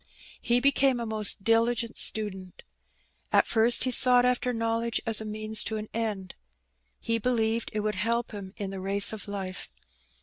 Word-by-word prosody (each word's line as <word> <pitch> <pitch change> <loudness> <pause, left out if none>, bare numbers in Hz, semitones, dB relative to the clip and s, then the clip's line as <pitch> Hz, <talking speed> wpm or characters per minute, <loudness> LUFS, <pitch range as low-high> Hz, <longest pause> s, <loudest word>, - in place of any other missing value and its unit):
He 240 +1 +1
became 270 -1 +2
a 235 - -4
most 215 -3 +2
diligent 230 +1 +1
student. 190 -4 -1 0.7
At - - +4
first 235 +1 +2
he 255 - 0
sought 250 0 +4
after 250 0 0
knowledge 230 0 -2
as 225 -1 +2
a - - -7
means 215 0 -2
to 220 - -1
an 215 0 -7
end. 210 -5 -4 0.7
He 230 0 -2
believed 230 -1 -1
that - - -5
it - - 0
would 210 0 -2
help 230 +4 -2
him 200 -3 -8
in 200 -2 -5
the 195 - -7
race 195 +3 +4
of 215 0 -7
life. 195 -2 -6
220 Hz, 175 wpm, -27 LUFS, 210-235 Hz, 0.7 s, At